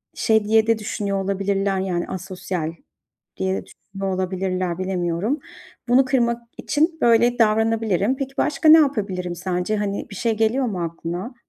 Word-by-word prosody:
şey 220 -2 +2
diye 220 +1 +3
de 225 -1 +2
düşünüyor 200 -2 -2
olabilirler, 195 0 0
yani 180 -2 -2
asosyal 185 -3 -4 0.7
diye 190 0 0
de - - -5
düşünüyor 195 -1 -6
olabilirler 185 -1 -2
bilemiyorum. 185 - -1 0.5
Bunu 255 +2 +5
kırmak 240 -3 +1 0.2
için 320 +2 0
böyle 235 +1 +4
davranabilirim. 220 0 +2
Peki, 270 0 -4
başka 305 +1 +2
ne 320 - +10
yapabilirim 195 - 0
sence? 180 +4 -2
Hani, 200 +1 -3
bir 200 - -9
şey 225 +2 -1
geliyor 225 +4 +2
mu 185 -7 -2
aklına? 170 +7 -5
200 Hz, 145 wpm, -22 LUFS, 185-235 Hz, 0.7 s, ne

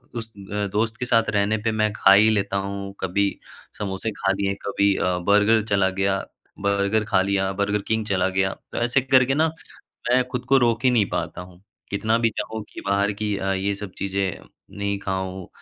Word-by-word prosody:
उस 115 -1 -5 0.2
अ, 105 0 -1
दोस्त 110 +1 0
के 125 - -2
साथ 115 -2 +2
रहने 105 +1 +1
पे - - +3
मैं 110 -1 +1
खा 100 - +6
ही 110 +2 +6
लेता 100 -2 0
हूँ 100 0 -5
कभी 100 +2 +1 0.5
समोसे 100 +2 -3
खा 95 -1 0
लिए 100 0 0
कभी 100 0 +2
अ, 90 -1 0
बर्गर 105 +2 +4
चला 100 -2 +3
गया 95 +1 0 0.4
बर्गर 100 +2 +1
खा 100 -3 +2
लिया, 95 0 0
बर्गर 100 +1 0
किंग 110 -1 0
चला 95 -2 +1
गया। 95 0 0 0.2
तो - - -6
ऐसे 120 +3 +2
करके 130 0 +4
न 160 +1 +2 0.6
मैं 125 0 +4
खुद 125 -1 -4
को 135 - +6
रोक 120 -1 +2
ही - - +7
नहीं 110 -5 +3
पाता - - -3
हूँ 90 0 -14 0.3
कितना 110 +3 +1
भी 115 -1 +3
चाहूँ 110 0 -3
कि - - -9
बाहर 100 +1 +2
की 105 -1 -1
अ, 95 0 -1
ये 95 +1 -1
सब 100 -1 -7
चीज़ें 95 -2 -2 0.4
नहीं 100 0 -1
खाऊँ, 95 -2 -4
100 Hz, 200 wpm, -23 LUFS, 95-110 Hz, 0.6 s, ही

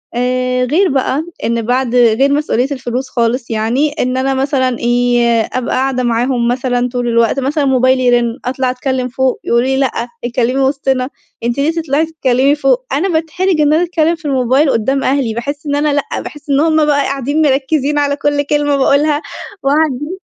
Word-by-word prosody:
آآ 255 0 0
غير 355 +9 +2
بقى 270 +3 -1 0.2
إن 230 0 0
بعد 245 +1 -1
غير 245 +3 +4
مسؤولية 275 -4 0
الفلوس 260 -1 -4
خالص 235 +1 -1
يعني، 230 +7 0
إن 255 +1 0
أنا 270 +1 0
مثلًا 265 -2 0
إيه، 240 -1 +2
أبقى 255 -1 -2
قاعدة 260 -1 0
معاهم 240 +1 0
مثلًا 245 0 0
طول 245 -1 -3
الوقت 235 +2 +2
مثلًا 285 +2 0
موبايلي 255 -1 +2
يرن، 240 +1 +1
أطلع 255 +1 -1
أتكلّم 255 0 -2
فوق 260 +1 -1
يقولوا 235 +1 +1
لي 265 0 0
لأ 270 -2 +1 0.3
اتكلّمي 250 +2 0
وسطنا، 265 -1 0 0.3
أنتِ 235 +2 -1
ليه 300 +3 +2
تطلعي 320 -2 0
تتكلّمي 280 -3 +1
فوق؟ 265 -3 +1
أنا 350 +8 0
باتحرج 330 +1 0
إن 295 0 +3
أنا 330 +3 +3
أتكلّم 335 -1 +1
في 310 - -19
الموبايل 270 +1 +2
قدّام 265 +5 0
أهلي، 260 -4 0
باحس 285 +6 -5
إن 285 - 0
أنا 290 0 +1
لأ 285 - -2
باحس 295 +1 -10
إن 275 0 +2
هُم 315 -1 +3
بقى 290 -1 +2
قاعدين 275 +3 -1
مركّزين 285 +1 +1
على 285 0 +1
كلّ 290 0 0
كلمة 290 0 0
باقولها، 290 +2 +2 0.4
وقاعدين 295 +3 0
265 Hz, 175 wpm, -15 LUFS, 245-290 Hz, 0.4 s, غير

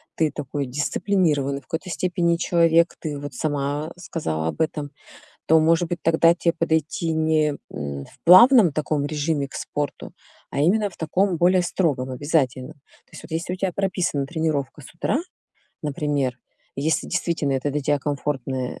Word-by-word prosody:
Ты 155 -2 +1
такой 140 0 -4
дисциплинированный 150 0 0
в - - -30
какой-то 165 +3 -4
степени 175 -1 0
человек. 170 -1 +3
Ты 150 -3 -4
вот 145 -1 -7
сама 145 +2 -2
сказала 80 - -3
об 80 - -4
этом, 150 -2 -2 0.6
то, 160 0 +5
может 165 +2 +3
быть, 175 - -3
тогда 165 +1 +4
те 170 0 +1
подойти 160 0 -1
не, 155 -1 +2 0.2
м, 70 -1 -5
в - - -21
плавном 185 - +8
таком 150 -1 -1
режиме 145 0 -1
к - - -16
спорту, 145 -1 -4 0.4
а - - -2
именно 205 +7 +3
в - - -17
таком 180 +3 0
более 180 +2 +4
строгом, 145 -8 -1
обязательном. 130 -2 -1
То 145 - -30
есть - - -10
вот, - - -13
если 165 +2 -3
у - - -3
тя 185 0 -1
прописана 180 -7 -1
тренировка 155 -4 -2
с 135 - -13
утра, 175 +10 0 0.6
например, 145 -3 -1 0.4
если 150 +3 0
действительно 160 -5 -1
это 135 +2 -1
для 150 +1 -1
тебя 145 +1 +1
комфортное 135 -2 -3
155 Hz, 165 wpm, -23 LUFS, 140-170 Hz, 0.6 s, плавном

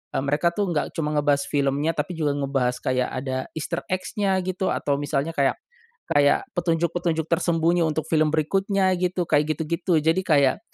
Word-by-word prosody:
eee, 135 - 0
mereka 145 +5 +2
tuh 190 +1 -2
enggak 150 - -1
cuma 150 -1 -1
ngebahas 145 -1 +2
filmnya 140 +3 0
tapi 155 +3 -3
juga 150 -3 0
ngebahas 135 -3 -1
kayak 125 -1 0
ada, 130 0 -3 0.2
easter 160 +2 -3
eggs-nya 195 +1 -1
gitu, 185 +1 -1
atau 140 -1 -1
misalnya 145 +1 -1
kayak 140 -1 +2 0.5
kayak 145 -1 +3
petunjuk-petunjuk 170 -1 0
tersembunyi 170 0 +2
untuk 160 0 -1
film 155 -1 +3
berikutnya 190 +4 +1
gitu, 180 0 0
kayak 150 +1 +2
gitu-gitu. 170 +1 0
Jadi 160 +3 +3
kayak 145 -2 +3
160 Hz, 160 wpm, -24 LUFS, 145-175 Hz, 0.5 s, kayak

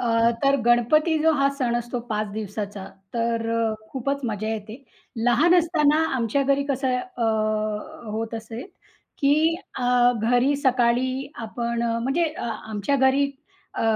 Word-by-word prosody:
अ, 230 -1 +3
तर 275 0 +4
गणपती 305 +7 +3
जो 320 +1 +3
हा 275 -1 +3
सण 240 -2 +1
असतो 240 +1 -3
5 215 -1 -1
दिवसाचा, 205 -2 -5 0.3
तर 230 -1 0 0.4
खूपच 275 +2 -2
मजा 215 -1 -2
येते. 220 +4 -5 0.4
लहान 300 +9 +4
असताना 320 -3 +3
आमच्या 240 +4 +1
घरी 275 +1 +1
कसं 260 -2 0
अ, 250 -1 -6 0.9
होत 225 +1 -3
असे 225 +2 -6 0.6
की 310 +4 +3 0.2
अ, 245 0 +3
घरी 245 +4 +3
सकाळी 255 0 +1 0.2
आपण 235 +1 -3
म्हणजे 235 +8 0 0.2
आमच्या 220 +2 -2
घरी 275 +1 +3 0.4
अ, - - -2
245 Hz, 130 wpm, -24 LUFS, 230-280 Hz, 0.9 s, तर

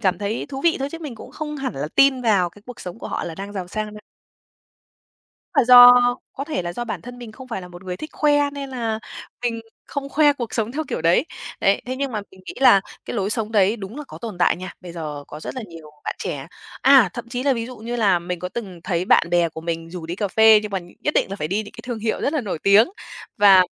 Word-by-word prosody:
cảm 185 -4 +1
thấy 205 +3 -3
thú 270 -1 -5
vị 335 - +4
thôi 275 +1 -2
chứ 330 - -6
mình 295 -7 -6
cũng 220 - -11
không 300 -1 -5
hẳn 270 - -3
là 140 +3 -3
tin 275 -2 +4
vào 200 -7 +3
cái 205 +4 -18
cuộc 250 -1 -10
sống 180 +3 -7
của - - -7
họ - - -3
là 165 - -5
đang 195 +3 -7
giàu 185 -3 -5
sang 215 +2 -4
đâu. 210 - -10 1.5
Là - - +4
do 245 0 +10 0.4
có 275 - -5
thể 300 - -2
là 175 - -4
do 240 +7 -4
bản 235 - -5
thân 245 +1 -10
mình 235 -3 -9
không 255 +3 -12
phải 225 - -4
là 180 - -10
một 175 +1 -12
người 180 -1 -4
thích 310 +10 -8
khoe 290 -1 +2
nên 280 -1 -6
là 230 -4 -2 0.4
mình 230 -2 -1 0.3
không 280 -1 -4
khoe 295 +1 +4
cuộc 240 -5 -6
sống 225 +1 -1
theo 315 +3 -2
kiểu - - -3
đấy. 170 - +3 0.3
Đấy, 195 - +3
thế 255 - -3
nhưng 275 -2 -2
mà 210 - -2
mình 190 - -17
nghĩ - - -7
là 225 -7 +7 0.2
cái - - -5
lối 200 -1 -1
sống 220 0 -2
đấy 205 +1 +3
đúng 205 +2 -8
là 300 - -6
có - - -10
tồn 220 -6 -7
tại 175 - +3
nha. 185 +1 -7
Bây 180 -2 -9
giờ 150 -4 -6
có 150 - -9
rất - - -6
là 255 - -5
nhiều 165 -3 -12
bạn - - -3
trẻ, - - -4 0.4
à, 265 -8 +7
thậm 240 0 -7
chí 245 +1 -3
là 275 0 +3
ví 230 -2 -3
dụ 250 0 -9
như 235 +2 -5
là 200 -6 +3
mình 175 +1 -5
có 180 - -4
từng 190 -4 -7
thấy 175 -1 0
bạn 170 - +4
bè 175 -1 +3
của 160 - -9
mình 165 0 -4
rủ 175 -2 -7
đi 170 +2 -4
cà 205 0 -1
phê 220 +1 +6
nhưng 210 - -5
mà 195 - -1 0.2
nhất 295 - -1
định - - +2
là 195 - -4
phải 150 - -3
đi 205 +5 0
những 205 - -12
cái - - -10
thương 240 -2 -4
hiệu 220 0 -2
rất 285 - 0
là 305 - +1
nổi 200 -8 -4
tiếng. 200 +4 +6 0.5
Và 195 -3 +7
215 Hz, 280 wpm, -22 LUFS, 180-250 Hz, 1.5 s, do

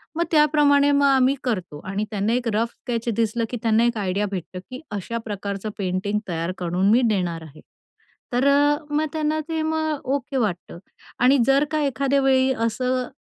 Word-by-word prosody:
मग 340 - +1
त्याप्रमाणे 295 -2 +4
मग 285 0 +3
आम्ही 265 -1 +4
करतो 185 - -3
आणि 195 +2 -2
त्यांना 210 +2 0
एक 245 0 -1
रफ 225 +2 +1
स्केच 235 -1 -5
दिसलं 230 +1 0
की 245 - -4
त्यांना 225 0 +3
एक 240 -1 0
आयडिया 200 0 -1
भेटतं 185 -1 -5
की 255 - -6
अशा 205 +3 -4
प्रकारचं 200 0 -4
पेंटिंग 195 +1 -1
तयार 165 +1 -2
करून 180 +2 0
मी 240 +3 +5
देणार 180 -5 -1
आहे. 155 -1 -14 0.7
तर 250 +3 +2
अ, 290 +1 +4
मग 300 +1 +1
त्यांना 310 0 0
ते 320 -1 -1
मग 315 -2 -1
ओके 275 0 -4
वाटतं 200 -8 -2 0.4
आणि 255 +3 +5
जर 275 +1 +4
का 310 - 0
एखाद्या 275 0 +1
वेळी 265 -1 +3 0.2
असं 250 +2 -1
240 Hz, 175 wpm, -23 LUFS, 200-280 Hz, 0.7 s, मी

